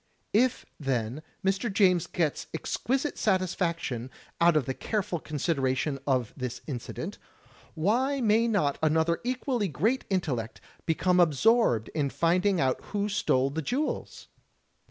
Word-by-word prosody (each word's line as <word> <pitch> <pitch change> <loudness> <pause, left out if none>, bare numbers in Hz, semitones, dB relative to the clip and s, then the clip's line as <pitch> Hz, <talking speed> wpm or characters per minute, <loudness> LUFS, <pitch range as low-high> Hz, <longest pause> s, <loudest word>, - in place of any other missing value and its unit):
If, 245 +3 +2
then, 130 -1 -2 0.2
Mr. 195 +4 +1
James 180 -4 +3
gets 160 -5 -1
exquisite 265 - -2
satisfaction 170 - 0 0.3
out 170 -2 +5
of 145 - +1
the 130 - -2
careful 190 0 -2
consideration 140 -2 -1
of 130 -5 +1
this 125 -2 -5
incident, 130 -6 -6 0.6
why 245 - +1
may 225 -1 +3
not 185 -11 +1
another 160 +2 +2
equally 250 -3 -1
great 205 - 0
intellect 140 - -2 0.3
become 180 +2 +2
absorbed 170 - +3
in 145 -3 -1
finding 180 +5 +2
out 130 -1 +1
who 205 0 -2
stole 135 -9 +1
the 160 +3 -2
jewels? 265 - -3
170 Hz, 125 wpm, -28 LUFS, 140-210 Hz, 0.6 s, out